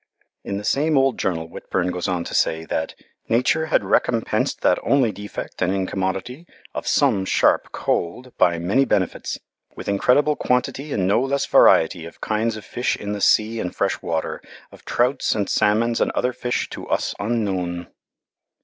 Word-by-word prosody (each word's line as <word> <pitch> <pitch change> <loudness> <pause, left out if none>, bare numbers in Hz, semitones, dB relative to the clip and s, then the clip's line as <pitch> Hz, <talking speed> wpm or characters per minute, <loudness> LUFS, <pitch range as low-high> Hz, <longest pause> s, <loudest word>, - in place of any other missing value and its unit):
In 100 - -3
the 105 - -5
same 150 +6 +2
old 135 -2 +2
journal 80 -3 -1
Whitbourne 90 +2 -2
goes 90 -1 -3
on 90 -2 -1
to - - -7
say 80 0 +1
that 80 - -3 0.3
"Nature 130 +7 +2
had 160 - +2
recompensed 115 -2 0
that - - +3
only 130 -5 +2
defect 105 0 -8
and 95 0 +2
incommoditie 95 - -3 0.3
of - - -5
some 95 - +3
sharpe - - +2
cold 125 +10 -2
by 85 -1 +3
many 95 +11 +2
benefits 95 -8 -1 0.4
with - - -8
incredible 140 +9 +3
quantitie 130 +3 -1
and 95 -6 0
no 100 +5 +3
less 140 +1 0
varietie 80 +1 +4
of 85 - -14
kindes 110 +1 -1
of 110 - -10
fish 120 - -1
in 105 - -5
the 100 - -5
sea 110 +3 +3
and 90 - -4
fresh - - -1
water, 80 -1 -3 0.3
of - - -16
trouts 125 +3 +1
and 100 -2 -1
salmons 115 +3 +2
and - - +2
other 125 0 0
fish 125 0 -2
to - - -7
us - - 0
unknowen." 95 -6 -2
105 Hz, 170 wpm, -22 LUFS, 90-125 Hz, 0.4 s, varietie